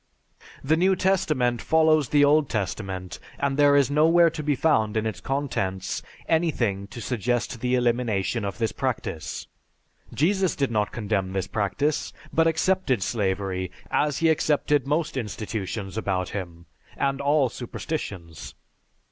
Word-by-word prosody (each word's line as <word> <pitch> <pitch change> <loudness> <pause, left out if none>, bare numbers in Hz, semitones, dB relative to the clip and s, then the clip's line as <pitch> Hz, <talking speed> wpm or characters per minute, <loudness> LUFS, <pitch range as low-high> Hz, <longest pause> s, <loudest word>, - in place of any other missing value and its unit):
The 155 +4 +3
New 190 +3 +3
Testament 150 - +1
follows 155 -3 +3
the 145 -1 +5
Old 145 0 +3
Testament, 95 -3 -4 0.2
and 140 -1 0
there 145 0 +5
is 140 -1 +3
nowhere 165 +3 +5
to 160 -1 -5
be 145 -1 +1
found 110 -8 +2
in 110 - 0
its 110 -5 -3
contents 125 -9 -2 0.3
anything 120 - 0
to 120 - -9
suggest 120 0 -2
the 125 0 +1
elimination 120 -3 0
of 100 -1 -4
this 115 -1 0
practice. 105 - -3 0.7
Jesus 190 +3 +1
did 140 -4 0
not 105 -2 0
condemn 100 -4 -2
this 95 -1 -1
practice, 110 +10 -1 0.2
but 165 0 +4
accepted 165 - +1
slavery 95 -3 -1 0.2
as 145 -1 +1
he 165 -1 +3
accepted 150 -3 +2
most 150 +1 0
institutions 105 -3 -4
about 95 -4 -1
him, 85 -4 -6 0.3
and 140 0 0
all 145 -1 +3
superstitions. 105 - -6
125 Hz, 140 wpm, -25 LUFS, 100-150 Hz, 0.7 s, the